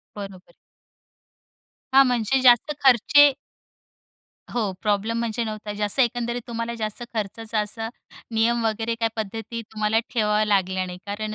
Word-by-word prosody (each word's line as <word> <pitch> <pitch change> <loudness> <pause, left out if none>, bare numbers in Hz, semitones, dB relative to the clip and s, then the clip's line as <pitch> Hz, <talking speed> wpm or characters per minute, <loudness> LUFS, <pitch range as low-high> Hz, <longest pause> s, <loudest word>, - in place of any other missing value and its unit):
बरोबर. 195 -3 -9 1.4
हां, 270 0 +8
म्हणजे 245 +1 +1
जास्त 245 +3 +5
खर्चे 275 +3 +6 1.2
हो, 215 -5 0
प्रॉब्लेम 215 +2 0
म्हणजे 235 0 -2
नव्हता 215 -1 -5
जास्त 210 +3 0
एकंदरीत 240 0 0
तुम्हाला 230 0 -3
जास्त 215 0 -4
खर्चाचा 220 +1 -3
असा, 225 +2 -3 0.5
नियम 230 +1 +2
वगैरे 225 +1 -1
काय 225 - +2
पद्धती 225 +2 -5
तुम्हाला 215 0 +1
ठेवाव्या 215 -2 +2
लागल्या 190 -3 +1
नाही 180 0 -8
कारण 215 +1 -4
225 Hz, 125 wpm, -24 LUFS, 210-235 Hz, 1.4 s, हां